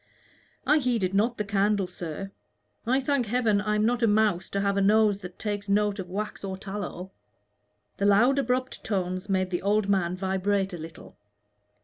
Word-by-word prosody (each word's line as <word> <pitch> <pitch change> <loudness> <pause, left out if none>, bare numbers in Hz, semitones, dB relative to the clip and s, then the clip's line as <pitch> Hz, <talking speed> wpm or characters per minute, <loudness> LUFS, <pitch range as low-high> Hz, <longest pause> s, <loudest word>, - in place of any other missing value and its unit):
"I 305 - +4
heeded 230 -8 0
not 225 +4 +1
the 210 - -1
candle, 200 0 +1
sir. 180 +2 -6 0.6
I 260 +3 +3
thank 275 -3 0
Heaven 220 -3 +2
I 210 0 0
am 210 0 +2
not 245 +1 +1
a 230 - +4
mouse 205 -3 +2
to 200 - -1
have 200 0 +1
a 200 - +1
nose 210 0 +4
that 180 -2 -10
takes 205 -1 -4
note 205 0 +1
of 180 -2 -6
wax 210 +3 -4
or 190 -1 -4
tallow." 190 -2 -6 0.9
The 200 - +1
loud 240 +7 +4
abrupt 255 0 -1
tones 185 -1 -2
made 185 -1 0
the 175 - -1
old 205 +1 +1
man 185 -2 +1
vibrate 190 +1 0
a 175 - -6
little. 160 -8 -11
200 Hz, 180 wpm, -27 LUFS, 190-215 Hz, 0.9 s, I